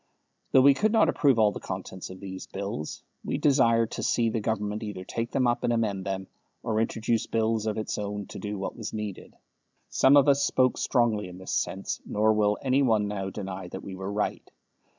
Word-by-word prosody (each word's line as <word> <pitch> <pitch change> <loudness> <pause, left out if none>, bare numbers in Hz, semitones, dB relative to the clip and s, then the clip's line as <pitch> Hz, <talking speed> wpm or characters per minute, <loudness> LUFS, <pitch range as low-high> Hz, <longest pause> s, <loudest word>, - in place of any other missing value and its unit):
Though 130 - +6
we 140 0 +8
could 210 +9 +1
not 215 -8 +4
approve 140 -7 +3
all 110 -2 +4
the - - -6
contents 95 -1 -6
of 95 0 -10
these 95 -1 -7
Bills, 100 -6 -5 0.2
we - - -2
desired 115 -5 +3
to - - -4
see 115 0 +2
the 115 - -1
Government 105 -1 -2
either 105 -4 -6
take 115 +4 -3
them 130 - +1
up 120 0 +1
and - - +2
amend 105 -5 -1
them, 95 -1 -3 0.4
or 110 0 0
introduce 115 0 0
Bills 110 -1 0
of 110 - -1
its 110 - -3
own 105 0 -4
to - - -7
do 105 -1 -4
what 95 - -4
was 110 -2 -6
needed. 105 -3 -6 0.5
Some 135 +2 +5
of 140 - +5
us 140 0 +4
spoke 130 -2 +2
strongly 115 -6 +1
in 90 0 -10
this 95 - -6
sense, - - -2
nor 110 +1 +2
will 105 -1 +2
any 135 +1 +3
one 110 -6 +2
now 95 -2 -3
deny 95 -2 -6
that 95 +2 -8
we 95 - -7
were 95 +1 -5
right. 105 0 -2
110 Hz, 210 wpm, -27 LUFS, 100-120 Hz, 0.5 s, we